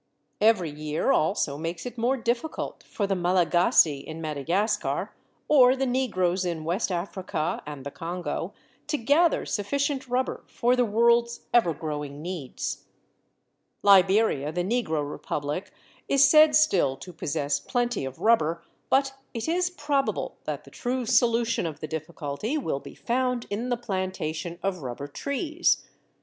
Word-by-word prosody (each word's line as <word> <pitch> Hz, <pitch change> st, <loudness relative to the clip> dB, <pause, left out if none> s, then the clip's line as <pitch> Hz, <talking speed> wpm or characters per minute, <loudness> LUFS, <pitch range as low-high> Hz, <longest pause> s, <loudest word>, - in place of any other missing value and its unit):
Every 205 Hz, -7 st, +3 dB
year 150 Hz, +1 st, -1 dB
also 155 Hz, -3 st, +1 dB
makes 165 Hz, +1 st, -4 dB
it 250 Hz, -, -6 dB
more 245 Hz, +3 st, +1 dB
difficult 240 Hz, +6 st, -3 dB
for 205 Hz, -, -3 dB
the 195 Hz, -, 0 dB
Malagasy 175 Hz, -4 st, +3 dB
in 160 Hz, +3 st, -8 dB
Madagascar, 170 Hz, +8 st, -1 dB, 0.3 s
or 260 Hz, -3 st, +6 dB
the 270 Hz, 0 st, 0 dB
Negroes 195 Hz, -8 st, 0 dB
in 170 Hz, -3 st, -3 dB
West 180 Hz, +6 st, -1 dB
Africa 175 Hz, -3 st, -2 dB
and 145 Hz, -3 st, -7 dB
the 140 Hz, -, -5 dB
Congo, 170 Hz, +1 st, -4 dB, 0.4 s
to 300 Hz, 0 st, 0 dB
gather 295 Hz, +8 st, +3 dB
sufficient 270 Hz, +5 st, -1 dB
rubber 250 Hz, +1 st, -1 dB
for 245 Hz, +1 st, +1 dB
the 250 Hz, -1 st, +3 dB
world's 235 Hz, +2 st, +3 dB
ever 230 Hz, -8 st, +5 dB
growing 150 Hz, -2 st, -5 dB
needs. 170 Hz, -7 st, -5 dB, 1.0 s
Liberia, 195 Hz, -6 st, +4 dB
the 175 Hz, +2 st, -1 dB
Negro 175 Hz, -9 st, -1 dB
Republic, 145 Hz, +5 st, -4 dB, 0.4 s
is 275 Hz, 0 st, +6 dB
said 305 Hz, +1 st, +7 dB
still 190 Hz, -, +3 dB
to 175 Hz, +7 st, -10 dB
possess 145 Hz, -2 st, -1 dB
plenty 240 Hz, -, -1 dB
of 135 Hz, 0 st, -6 dB
rubber; 170 Hz, -7 st, +2 dB, 0.3 s
but 270 Hz, 0 st, +3 dB, 0.2 s
it 230 Hz, -, -3 dB
is 355 Hz, +2 st, +1 dB
probable 290 Hz, -5 st, -1 dB
that -, -, -4 dB
the -, -, -16 dB
true 250 Hz, 0 st, -2 dB
solution 235 Hz, -4 st, +2 dB
of 155 Hz, -, -7 dB
the 155 Hz, -, -5 dB
difficulty 160 Hz, -, -4 dB
will 255 Hz, -, -2 dB
be -, -, -12 dB
found 250 Hz, 0 st, -1 dB
in 230 Hz, +5 st, -2 dB
the 245 Hz, -, +1 dB
plantation 185 Hz, -6 st, -3 dB
of 195 Hz, -2 st, -1 dB
rubber 130 Hz, +1 st, -5 dB
trees. 300 Hz, -, 0 dB
195 Hz, 145 wpm, -26 LUFS, 160-245 Hz, 1.0 s, said